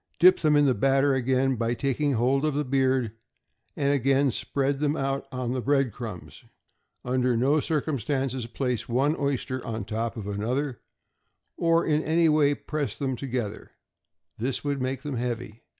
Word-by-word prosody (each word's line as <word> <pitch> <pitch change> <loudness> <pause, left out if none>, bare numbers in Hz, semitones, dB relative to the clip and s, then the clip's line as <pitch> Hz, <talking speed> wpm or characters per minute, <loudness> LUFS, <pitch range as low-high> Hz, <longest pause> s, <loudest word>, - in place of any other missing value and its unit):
Dip 185 +3 +6
them 150 -2 +3
in 145 0 +5
the 130 - +4
batter 135 +5 +3
again 130 0 +1
by 115 +1 0
taking 140 +3 0
hold 130 +4 +2
of 155 -2 0
the 150 0 0
beard, 130 -3 +1 0.6
and 140 0 +1
again 135 0 +2
spread 140 +3 -1
them 150 0 +1
out 135 -1 -2
on 125 -2 -3
the 130 0 -1
bread 135 -1 +2
crumbs. 110 -5 -8 0.6
Under 125 -1 +1
no 140 +6 +3
circumstances 135 -4 -1
place 125 -1 -3
one 135 +6 +2
oyster 135 -3 -2
on 110 -4 -4
top 110 +3 -3
of 105 -3 -5
another, 120 +6 -2 0.7
or 165 0 +2
in 155 -1 +2
any 160 +1 +3
way 145 -2 +3
press 150 -1 -3
them 135 -3 -2
together; 120 -5 -4 0.7
this 125 +4 -1
would 140 -2 -1
make 130 +1 -2
them 145 -4 -3
heavy. 120 -2 -4
135 Hz, 165 wpm, -26 LUFS, 120-145 Hz, 0.7 s, Dip